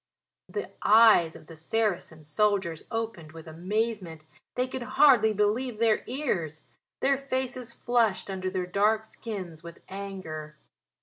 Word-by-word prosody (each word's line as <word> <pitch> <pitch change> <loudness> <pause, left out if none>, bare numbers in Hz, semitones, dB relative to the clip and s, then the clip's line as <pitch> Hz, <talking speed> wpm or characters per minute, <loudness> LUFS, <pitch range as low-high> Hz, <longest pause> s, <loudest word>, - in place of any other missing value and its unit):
The 420 - -4
eyes 215 -7 +6
of - - -12
the 165 - -12
Saracen 175 -2 -1
soldiers 185 +1 0
opened 225 -9 -4
with 160 -1 -10
amazement: 180 -1 -3 0.3
they 250 +1 0
could 260 0 -5
hardly 255 -2 +5
believe 215 +4 0
their 225 -1 +2
ears. 185 - -2 0.4
Their 275 0 +3
faces 260 -3 -3
flushed 235 -4 +1
under 185 -1 -2
their 185 -1 -2
dark 210 +4 +2
skins 190 -8 -7
with 170 0 -11
anger. 185 -6 -7
210 Hz, 130 wpm, -28 LUFS, 170-230 Hz, 0.4 s, eyes